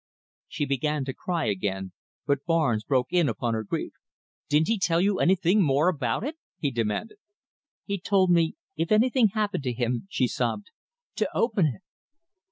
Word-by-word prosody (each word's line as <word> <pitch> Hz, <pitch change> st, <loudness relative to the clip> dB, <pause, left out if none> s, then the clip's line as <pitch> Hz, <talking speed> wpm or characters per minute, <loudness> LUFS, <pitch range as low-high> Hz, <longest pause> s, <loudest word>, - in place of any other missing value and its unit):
She 150 Hz, -, -2 dB
began 140 Hz, +1 st, -1 dB
to 135 Hz, -, -4 dB
cry 170 Hz, +2 st, -2 dB
again, 95 Hz, -2 st, -2 dB, 0.3 s
but 140 Hz, -1 st, 0 dB
Barnes 150 Hz, -10 st, +2 dB
broke 130 Hz, -2 st, +1 dB
in 175 Hz, -6 st, +3 dB
upon 115 Hz, +1 st, -2 dB
her 110 Hz, -1 st, -2 dB
grief. 100 Hz, -, -4 dB, 0.6 s
"Didn't 150 Hz, +2 st, +3 dB
he 225 Hz, -2 st, +1 dB
tell 170 Hz, -3 st, +2 dB
you 195 Hz, +1 st, +2 dB
anything 190 Hz, +2 st, +3 dB
more 150 Hz, +1 st, +3 dB
about 140 Hz, -, -1 dB
it?" 305 Hz, +5 st, -4 dB, 0.2 s
he 145 Hz, -, -1 dB
demanded. 120 Hz, -, -2 dB, 0.7 s
"He 200 Hz, -1 st, -2 dB
told 190 Hz, 0 st, +2 dB
me 165 Hz, -2 st, +3 dB, 0.2 s
if 165 Hz, +4 st, -2 dB
anything 235 Hz, +2 st, +4 dB
happened 210 Hz, -3 st, -1 dB
to 125 Hz, -, 0 dB
him," 120 Hz, +6 st, -2 dB
she 130 Hz, -9 st, +1 dB
sobbed, 125 Hz, -, -2 dB, 0.5 s
"to -, -, 0 dB
open 210 Hz, -8 st, +2 dB
it." 145 Hz, +6 st, -5 dB
155 Hz, 170 wpm, -26 LUFS, 125-195 Hz, 0.7 s, anything